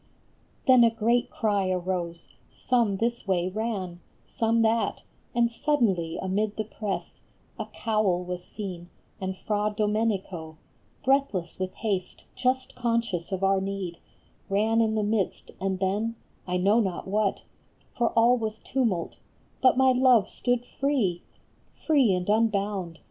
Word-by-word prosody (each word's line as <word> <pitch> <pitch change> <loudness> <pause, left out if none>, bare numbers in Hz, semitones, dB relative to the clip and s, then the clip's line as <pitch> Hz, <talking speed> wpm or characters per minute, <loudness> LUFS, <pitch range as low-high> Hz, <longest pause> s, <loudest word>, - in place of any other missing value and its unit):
Then 255 -2 +7
a 230 - +6
great 230 +2 +1
cry 205 -4 0
arose, 175 -2 -3 0.2
some 235 -6 +1
this 235 0 -1
way 180 -1 +1
ran, 195 -4 -3 0.3
Some 225 0 +1
that, 225 -1 +1 0.3
and 235 -1 +3
suddenly 215 - +1
amid 205 +3 -1
the 215 - 0
press 215 -1 -5 0.4
A - - -3
cowl 215 -5 0
was 180 0 -5
seen, 180 -4 -7 0.3
and 190 0 -3
Fra 210 +1 -1
Domenico, 200 -7 -1 0.5
Breathless 260 -12 +1
with 185 0 -3
haste, 195 -5 -3
just 255 +1 0
conscious 230 -8 -1
of 190 0 -2
our 195 0 +3
need, 195 -3 -4 0.5
Ran 220 +3 +2
in 220 -1 +1
the 215 - +1
midst, 205 -2 -1
and 190 0 -1
then, 205 +5 -1 0.3
I 180 0 0
know 200 +5 +4
not 190 -5 -2
what, 205 0 0 0.5
For 240 - +2
all 240 +2 +5
was 220 -1 -3
tumult, 220 -8 -1 0.4
but 255 -1 +5
my 265 0 +5
love 250 -5 +4
stood 245 -1 0
free! 250 -12 0 0.6
Free 280 -9 +4
and 180 -1 -1
unbound 205 -5 +1
210 Hz, 140 wpm, -27 LUFS, 185-230 Hz, 0.6 s, Then